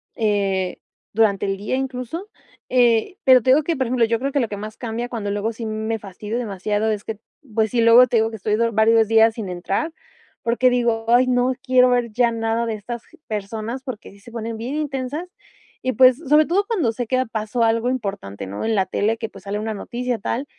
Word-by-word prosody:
eh, 200 -4 0 0.3
durante 210 -2 +2
el 195 0 -1
día 210 +6 -2
incluso, 265 - -4 0.4
eh, 245 - +3
pero 255 -2 +7
te 255 - -1
digo 295 +3 +5
que, 335 +2 -1
por 260 -3 -1
ejemplo, 240 -1 +2
yo 225 0 0
creo 275 +2 -2
que 285 - +1
lo 235 - +1
que 205 - -5
más 215 +1 -7
cambia 235 0 -4
cuando 205 -4 -3
luego 205 +2 -1
sí 225 0 -7
me 220 +1 -2
fastidio 210 +3 -6
demasiado 210 -1 -1
es 210 -1 -3
que, 220 -1 -6 0.3
pues 220 -1 +1
sí, 235 - +2
luego 230 +2 +7
te 230 - +1
digo 220 0 +2
que 220 - -7
estoy 210 +2 0
do 230 +1 +1
varios 220 0 +4
días 225 0 +5
sin 215 -5 -5
entrar, 195 - -2 0.5
porque 240 +2 +3
digo: 235 -2 0
"Ay, 250 +2 +5
no 250 +1 +2
quiero 255 -1 +5
ver 245 -2 +1
ya 235 0 +3
nada 225 +1 -1
de 225 - -2
estas 230 +3 -7 0.2
personas, 220 +4 -4
porque 255 -8 -7
sí 200 - -18
se 225 +4 -14
ponen 230 -1 -5
bien 240 +6 -4
intensas". 290 +1 -3 0.6
Y, 255 - 0
pues 255 +2 +6
sobre 305 0 +3
todo 390 +5 +1
cuando 355 - +1
sé 245 +1 -3
que 255 +2 +1
pasó 220 +2 -1
algo 230 +2 +2
importante, 195 - -4
¿no? 100 +2 -5
En 225 - +1
la 190 -2 +2
tele 220 +2 0
que, 225 -1 -4
pues, 195 - -14
sale 205 +1 -3
una 220 0 -3
noticia 245 +3 -3
tal 245 +7 -2
230 Hz, 220 wpm, -21 LUFS, 215-250 Hz, 0.6 s, pero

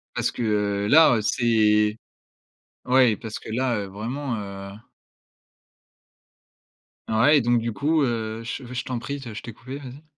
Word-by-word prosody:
Parce - - 0
que, - - -6 0.4
heu, - - -1
là 145 -2 +6
c'est 105 -2 +2 0.9
Ouais 125 -3 +4
parce 110 -3 -7
que, - - -11
là, 125 0 0
heu, 100 - -3
vraiment, 120 +7 -4
heu 100 -2 -7 2.4
Ah, 110 0 +1
ouais 150 +2 +6
et - - +3
donc 120 0 +2
du 115 0 -3
coup, 155 +6 +1
heu 115 -2 -2
je 125 +4 -5
je 125 - -3
t'en 125 - -3
prie 140 +4 -5
de 120 -4 -8
je 105 - -7
t'ai 115 - -7
coupé. 130 +5 -8
Vas-y. 140 +1 -10
120 Hz, 165 wpm, -24 LUFS, 110-130 Hz, 2.4 s, là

